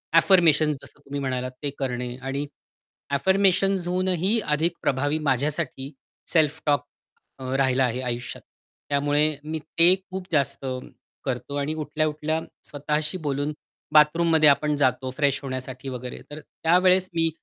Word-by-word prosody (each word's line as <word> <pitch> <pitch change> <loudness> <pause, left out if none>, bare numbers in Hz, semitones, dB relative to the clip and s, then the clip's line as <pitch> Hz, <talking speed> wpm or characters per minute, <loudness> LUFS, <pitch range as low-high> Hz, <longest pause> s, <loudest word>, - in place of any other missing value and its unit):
Affirmation 165 -4 +5
जसं 145 +1 -13
तुम्ही 140 0 -6
म्हणालात 130 -1 -2
ते 145 - 0
करणे 125 -2 -3
आणि 135 +2 -3 0.7
ॲफर्मेशन्स 190 +3 +2
होऊनही 185 +4 +1 0.2
अधिक 165 +3 0
प्रभावी 145 +4 0
माझ्यासाठी 140 +1 -1 0.4
सेल्फ 155 -4 +2
टॉक 145 -1 +2 0.5
अ, 130 0 -3
राहिला 130 -1 +2
आहे 125 +2 -2
आयुष्यात. 120 -1 -4 0.5
त्यामुळे 145 +1 +2
मी 155 +1 -4
ते 165 +4 +4
खूप 190 -1 -8
जास्त 140 -2 0 0.6
करतो 130 +2 -3
आणि 145 +2 -1
उठल्या 155 0 -1
उठल्या 155 +1 -2 0.3
स्वतःशी 150 +4 -2
बोलून 145 +2 -1 0.4
बाथरूममध्ये 155 0 +5
आपण 150 +1 +2
जातो 130 0 +1
फ्रेश 140 -2 +2
होण्यासाठी 130 0 -5
वगैरे 125 -1 -6
तर 150 - -7
त्यावेळेस 185 +2 +2
मी 165 0 +3
150 Hz, 130 wpm, -25 LUFS, 135-165 Hz, 0.7 s, Affirmation